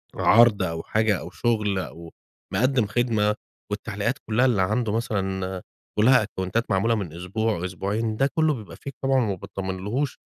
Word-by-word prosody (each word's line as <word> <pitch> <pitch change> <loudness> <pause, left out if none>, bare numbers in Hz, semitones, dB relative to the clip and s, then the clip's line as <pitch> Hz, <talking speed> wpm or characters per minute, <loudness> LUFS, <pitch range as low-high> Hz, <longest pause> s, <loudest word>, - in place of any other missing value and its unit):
عرض 115 -3 +5
أو 80 -2 -3
حاجة 110 -3 +1
أو - - -7
شغل 105 +1 0
أو 85 -2 -8 0.4
مقدم 130 -2 +2
خدمة، 105 -2 +1 0.4
والتعليقات 105 +3 -2
كلّها 115 +4 +3
اللي 120 -7 +3
عنده 105 +4 +1
مثلًا 95 -4 -2 0.4
كلّها 125 +2 +6
أكونتات 100 +3 -2
معمولة 110 +4 +2
من 95 -8 -4
أسبوع، 90 +2 -2
أسبوعين، 105 +4 -2
ده 135 - +3
كلّه 155 -1 +3
بيبقى 110 -7 -8
Fake 140 - -7
طبعًا 135 0 +2
وما 110 -6 +1
باطمنلهوش، 95 +9 -3
105 Hz, 150 wpm, -25 LUFS, 95-115 Hz, 0.4 s, كلّها